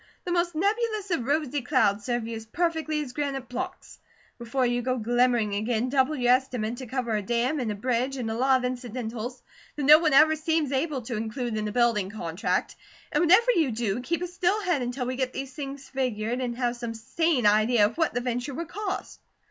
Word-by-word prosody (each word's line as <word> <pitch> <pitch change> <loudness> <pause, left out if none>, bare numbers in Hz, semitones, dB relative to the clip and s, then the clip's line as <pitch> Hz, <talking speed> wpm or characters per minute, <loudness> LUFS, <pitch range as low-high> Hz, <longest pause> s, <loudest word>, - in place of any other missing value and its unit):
The 355 - -2
most 345 -1 +1
nebulous 420 +2 0
of 265 -9 0
rosy 290 0 0
clouds 215 -6 +1
serve 240 -2 -1
you 230 - -4
as 220 0 -8
perfectly 320 +1 -1
as 250 -3 -9
granite 275 -2 -3
blocks. 250 +1 -6 0.4
Before 240 +2 0
you 245 0 +1
go 255 +1 -1
glimmering 240 -2 +2
again, 220 +4 0
double 270 +3 +2
your 245 -2 +4
estimate 250 -3 -1
to 260 -1 -7
cover 235 -2 -2
a 210 - 0
dam 240 +7 0
and 235 -4 -1
a - - -3
bridge, 250 +4 -1
and 230 -3 -3
a - - -1
lot 260 +3 +3
of 250 - -3
incidentals 245 -1 -5 0.3
that 295 - -3
no 300 +3 +9
one 315 -3 +2
ever 310 +3 +6
seems 315 -2 0
able 275 -1 -1
to 235 0 -4
include 225 +2 -3
in 215 0 -2
a - - -3
building 230 -4 +2
contract. 175 -4 -2 0.4
And - - +2
whatever 385 +9 +6
you 320 - +2
do, 225 -1 -2
keep 340 +7 -2
a - - -2
still 360 +3 0
head 350 -8 +1
until 250 +1 -3
we 255 +1 -3
get 260 -1 -1
these 270 -1 -5
things 275 -1 -7
figured, 245 -2 -2
and 240 -2 -3
have 245 -1 -1
some 235 -1 -5
sane 270 +3 0
idea 215 +1 +5
of 215 - -2
what 325 - +1
the 245 - 0
venture 245 +2 -3
would 335 +1 -5
cost." 395 -1 -5
255 Hz, 215 wpm, -26 LUFS, 235-300 Hz, 0.4 s, no